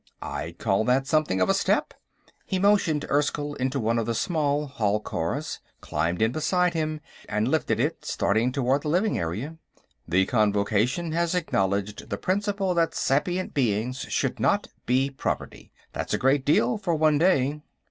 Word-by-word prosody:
"I'd - - -5
call 95 +2 +1
that 130 +2 +2
something 145 -9 +1
of 90 - +3
a - - +3
step." - - +1 0.5
He 190 - -1
motioned 185 -6 +2
Erskyll 145 0 0
into 130 +2 -1
one 115 0 +1
of 115 - -2
the 115 - -1
small 150 +1 0
hall 110 -7 0
cars, 115 - -3 0.2
climbed 85 +6 -1
in 110 - +2
beside 175 +5 +1
him, 155 -2 -2 0.3
and 105 +2 0
lifted 155 +4 0
it, - - -1
starting 110 +5 +1
toward 135 +1 +1
the 150 - -5
living 185 +8 +1
area. 110 - -4 0.5
"The 90 +3 +3
Convocation 110 - +1
has 170 +2 0
acknowledged 100 - -1
the 100 - -2
principle 195 - 0
that 170 -1 +1
sapient 175 +7 0
beings 125 0 0
should - - -1
not - - +1 0.2
be 130 +3 +2
property. 135 - -4 0.2
That's - - -2
a - - 0
great 135 +1 +2
deal, 125 - +2
for 175 -5 0
one 155 -1 +3
day." 150 -4 +2
140 Hz, 165 wpm, -26 LUFS, 110-160 Hz, 0.5 s, of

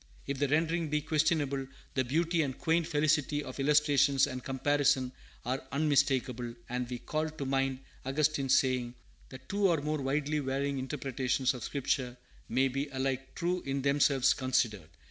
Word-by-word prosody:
If 140 -1 -3
the 145 - +2
rendering 160 +2 +1
be 150 0 0
questionable, 150 -3 0 0.3
the 130 - +1
beauty 165 +6 +1
and 135 -4 -2
quaint 165 0 +1
felicity 150 -2 +1
of 130 - -8
illustration 145 -1 +3
and 130 -2 -6
comparison 135 -1 +1 0.3
are 130 +2 -1
unmistakable; 135 -4 +1
and 125 0 -3
we 125 - -3
call 155 +5 -2
to 155 -3 -6
mind 135 0 0 0.2
Augustine's 140 0 +2
saying, 125 -2 0 0.3
that 130 - -12
two 200 0 +2
or 170 -4 +2
more 150 0 -2
widely 145 +3 0
varying 140 0 -1
interpretations 130 -1 -1
of 125 -3 -7
Scripture 125 -2 -2 0.3
may 130 +3 +3
be 135 +3 -2
alike 135 0 -3
true 180 +1 -1
in 135 0 -3
themselves 140 -1 +3
considered. 115 - 0
140 Hz, 155 wpm, -31 LUFS, 130-150 Hz, 0.3 s, illustration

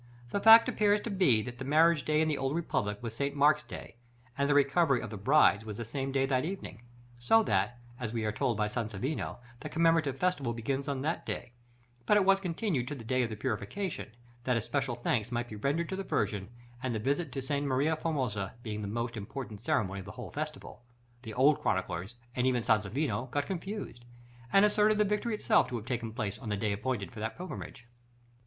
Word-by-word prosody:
The - - 0
fact 225 +2 +9
appears 210 0 +3
to 230 - -4
be, 160 - +3
that 120 0 -8
the - - -4
marriage 155 +1 +4
day 155 +1 +2
in 160 - +2
the 150 -2 0
old 135 +2 -1
republic 130 -11 -1
was 115 -1 -5
St. 140 +3 -2
Mark's 150 +1 +4
day, 120 - -10 0.4
and 140 0 0
the 145 - +4
recovery 140 -1 +4
of - - -6
the - - -5
brides 110 0 +4
was 105 -2 -6
the 115 - -4
same 135 +4 -3
day 135 0 +2
at 130 -1 +1
evening; 185 - -6 0.4
so 225 - +4
that, 105 - 0 0.2
as 120 -3 -3
we 115 -2 -2
are 105 - +1
told 115 +1 0
by 105 -1 +1
Sansovino, 115 +5 -3 0.2
the - - -6
commemorative 165 -4 +2
festival 145 -8 0
began 135 +4 -2
on 140 -2 -2
that 160 +3 -1
day, - - -5 0.6
but 210 - +6
it 200 - +3
was 195 0 +5
continued 170 - -1
to 145 - -4
the 120 - -9
day 130 +3 +1
of 120 - 0
the 110 - -5
Purification, 135 - -3 0.3
that 125 -1 +1
especial 130 +2 -1
thanks 120 -1 -1
might 120 0 -1
be 110 - -7
rendered 145 +10 -1
to 190 - -2
the 195 - -3
Virgin; 105 - -1 0.3
and, 125 -3 -2
the - - -1
visit 140 +6 -1
to 135 - -3
Sta. 140 +2 -1
Maria 145 +3 +1
Formosa 125 - -2
being 105 -3 -4
the 105 - -4
most 115 +3 -3
important 110 0 -6
ceremony 100 -4 0
of 95 - -9
the - - -8
whole - - -8
festival, - - -6 0.4
the 110 -4 -8
old 140 +4 +4
chroniclers, 95 +7 -2 0.2
and 125 0 +2
even 125 -2 +1
Sansovino, 110 +3 0
got 145 +3 -1
confused, 190 - -5 0.5
and 195 +1 +6
asserted 210 0 +3
the 210 - +4
victory 210 +2 0
itself 215 0 +3
to 125 - -5
have 115 -2 -5
taken 120 -3 -3
place 110 -3 -3
on 115 - -7
the 105 - 0
day 105 +1 0
appointed 110 0 -3
for 115 - -10
that 110 +1 -4
pilgrimage. 175 -7 -7
130 Hz, 215 wpm, -31 LUFS, 110-160 Hz, 0.6 s, fact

